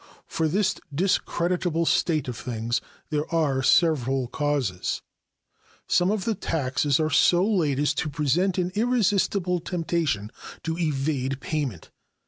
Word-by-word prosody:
For 160 - -1
this 190 +5 +1 0.2
discreditable 175 0 0
state 155 -4 +1
of 125 - -4
things 120 +1 -2 0.3
there 150 +1 -1
are 150 -5 +1
several 135 -4 +3
causes. 140 -12 -1 0.8
Some 175 +1 +3
of 210 -1 -1
the 230 - +1
taxes 145 -5 0
are 155 0 0
so 175 +5 +4
laid 165 -11 +1
as 145 +1 +2
to 155 - -3
present 155 +7 +1
an 180 0 0
irresistible 205 -5 +1
temptation 165 - -2 0.3
to 160 0 -2
evade 140 -4 -1
payment. 135 - -4
155 Hz, 125 wpm, -25 LUFS, 135-180 Hz, 0.8 s, so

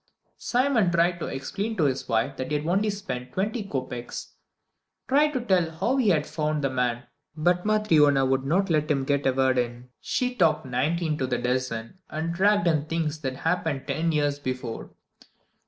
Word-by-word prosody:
Simon 245 -6 +2
tried 175 +1 +2
to - - -3
explain 200 +12 -4
to 165 - +2
his 135 -3 0
wife 115 +4 +1
that 130 -1 -4
he 150 - 0
had 150 - -5
only 195 +6 +1
spent 130 -12 -5
twenty 210 +4 -1
kopeks; 130 -8 -5 0.8
tried 290 +3 +4
to 255 - -1
tell 185 -8 +2
how 190 +12 -1
he 245 -6 +3
had 155 -5 +2
found 155 -1 -2
the 135 - +1
man 125 -2 -1 0.3
but 175 +4 +1
Matryona 155 -11 +4
would 135 0 +1
not 180 +7 +1
let 155 -1 +1
him 140 -3 +1
get 140 0 +1
a - - +4
word 130 -1 +2
in. 120 +1 -4
She 250 0 -1
talked 160 -8 +2
nineteen 155 +5 -1
to 130 - 0
the 125 - 0
dozen, 125 +3 -2
and 160 +2 -3
dragged 200 +1 +3
in 155 -4 +2
things 160 -1 -2
that 130 -2 -3
had - - -12
happened 160 -5 0
ten 165 +1 0
years 145 -2 0
before. 130 -4 -5
155 Hz, 190 wpm, -26 LUFS, 130-185 Hz, 0.8 s, tried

